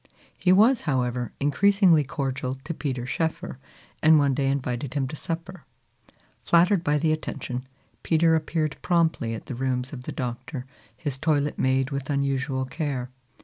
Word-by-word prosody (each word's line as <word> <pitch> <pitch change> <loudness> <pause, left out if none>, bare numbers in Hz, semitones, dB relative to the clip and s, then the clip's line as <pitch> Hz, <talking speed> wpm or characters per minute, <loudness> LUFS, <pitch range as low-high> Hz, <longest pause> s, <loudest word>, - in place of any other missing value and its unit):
He 180 - +3
was, 220 +6 +5
however, 125 -2 -1
increasingly 180 +2 +4
cordial 135 -2 -3
to 165 - -4
Peter 130 -6 -3
Schoeffer, 150 -1 -3 0.4
and 160 0 +7
one 140 -2 +3
day 135 +1 0
invited 130 0 -2
him 135 -2 0
to 150 - -6
supper. 165 +2 -6 0.8
Flattered 175 +2 +4
by 150 -1 +2
the 155 +1 +1
attention, 130 -4 -4 0.3
Peter 165 0 +3
appeared 155 -1 0
promptly 160 -10 +1
at - - -9
the - - -6
rooms 130 +1 -2
of 125 -2 -8
the - - -4
Doctor, 125 +1 -5 0.3
his 140 -4 -4
toilet 150 -1 0
made 130 +1 +1
with 140 0 -4
unusual 135 -1 0
care. 130 -3 -3
140 Hz, 150 wpm, -25 LUFS, 130-160 Hz, 0.8 s, and